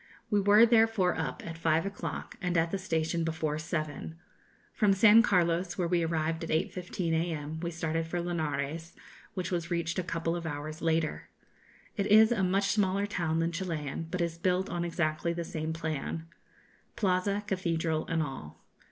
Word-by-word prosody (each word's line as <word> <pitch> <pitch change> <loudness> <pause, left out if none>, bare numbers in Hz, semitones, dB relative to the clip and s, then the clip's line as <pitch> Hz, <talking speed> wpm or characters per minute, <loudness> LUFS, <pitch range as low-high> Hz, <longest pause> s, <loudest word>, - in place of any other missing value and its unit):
We 205 -1 +3
were 205 +3 +7
therefore 225 -5 +4
up 155 -6 -4
at 165 0 -7
five 165 0 +2
o'clock, 200 0 -5
and 180 -2 0
at 165 0 +2
the 195 - -1
station 165 -2 -1
before 160 -2 -1
seven. 155 -1 -4 0.6
From 205 -2 +3
San 210 +3 +7
Carlos, 180 -3 +1
where 180 -2 0
we 175 0 +2
arrived 165 0 -1
at 165 - -5
8.15 180 0 -1
a.m., 160 -2 -2
we 170 +1 -2
started 165 -1 -2
for 175 +1 -2
Linares, 160 -2 -3 0.4
which 185 0 -3
was 170 -2 -2
reached 170 +1 -1
a - - -1
couple 165 -1 -2
of 170 -1 -4
hours 155 +1 -5
later. 165 -1 0 0.7
It 200 -1 0
is 220 +2 +7
a 230 -5 +1
much 195 +2 +2
smaller 200 -1 +2
town 170 -6 -1
than 165 +1 +1
Chilian, 165 -4 -4
but 180 +1 -2
is 170 -1 -2
built 185 +2 +1
on 175 -1 -1
exactly 170 -1 -1
the 170 0 -3
same 160 -1 -4
plan 160 0 -3 0.7
Plaza, 200 +1 +1
cathedral, 165 -5 -1
and 165 -1 +1
all. 135 - -8
170 Hz, 170 wpm, -30 LUFS, 160-185 Hz, 0.7 s, were